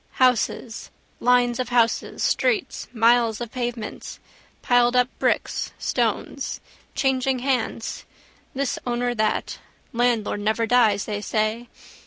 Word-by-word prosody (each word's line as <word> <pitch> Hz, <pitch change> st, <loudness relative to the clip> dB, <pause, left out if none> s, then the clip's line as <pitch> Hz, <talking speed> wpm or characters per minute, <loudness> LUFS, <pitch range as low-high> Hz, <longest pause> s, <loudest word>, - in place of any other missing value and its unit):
Houses, 250 Hz, -2 st, +1 dB, 0.3 s
lines 245 Hz, 0 st, +3 dB
of 255 Hz, -, -2 dB
houses, 235 Hz, -2 st, +1 dB
streets, 445 Hz, -7 st, 0 dB
miles 230 Hz, -1 st, +3 dB
of 240 Hz, -2 st, -5 dB
pavements, 240 Hz, -3 st, -5 dB, 0.5 s
piledup 245 Hz, 0 st, +3 dB
bricks, -, -, 0 dB
stones. -, -, -2 dB, 0.4 s
Changing 265 Hz, -1 st, +1 dB
hands. 250 Hz, -3 st, -2 dB, 0.5 s
This 275 Hz, -1 st, -1 dB
owner, 245 Hz, 0 st, 0 dB
that. 215 Hz, -2 st, -1 dB, 0.3 s
Landlord 235 Hz, -3 st, +1 dB
never 220 Hz, +2 st, 0 dB
dies 225 Hz, -4 st, +3 dB
they 205 Hz, -1 st, -3 dB
say. 215 Hz, +3 st, -1 dB
240 Hz, 105 wpm, -23 LUFS, 225-250 Hz, 0.5 s, lines